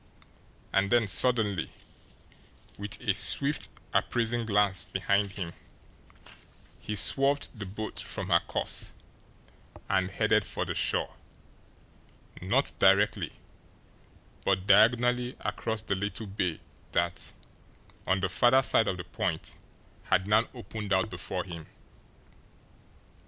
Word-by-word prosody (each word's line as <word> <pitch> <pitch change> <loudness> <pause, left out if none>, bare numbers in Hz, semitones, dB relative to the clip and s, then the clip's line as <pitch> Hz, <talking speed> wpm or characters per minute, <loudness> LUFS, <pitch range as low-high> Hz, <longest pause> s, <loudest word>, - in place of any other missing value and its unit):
And 100 0 +2
then 120 -1 +3
suddenly, 105 -4 +3 1.0
with 105 +1 -5
a 110 -5 +1
swift, 140 +8 +3 0.3
appraising 120 -1 0
glance 100 -3 +2
behind 100 +1 -1
him, 90 -5 -5 1.3
he 105 - -5
swerved 140 +6 +4
the 105 -5 -8
boat 110 +3 -6
from - - -4
her - - +5
course - - -2 0.9
and 95 0 +1
headed 110 +2 +1
for - - -4
the - - -3
shore - - 0 1.3
not 120 +10 +1
directly, 100 +2 +3 1.1
but 95 -1 0
diagonally 120 +4 +3
across 110 -2 -3
the 100 - -2
little 100 +2 -3
bay 95 -4 -3 0.3
that, 85 0 -1 0.8
on 95 0 +1
the 95 - +1
farther 125 +7 +4
side 115 - +3
of 95 - -1
the 90 - -6
point, - - -4 0.5
had 95 - +1
now 110 +2 +3
opened 105 -2 -7
out 95 +3 +1
before 90 0 -4
him. 85 -3 -9
105 Hz, 115 wpm, -28 LUFS, 95-115 Hz, 1.3 s, her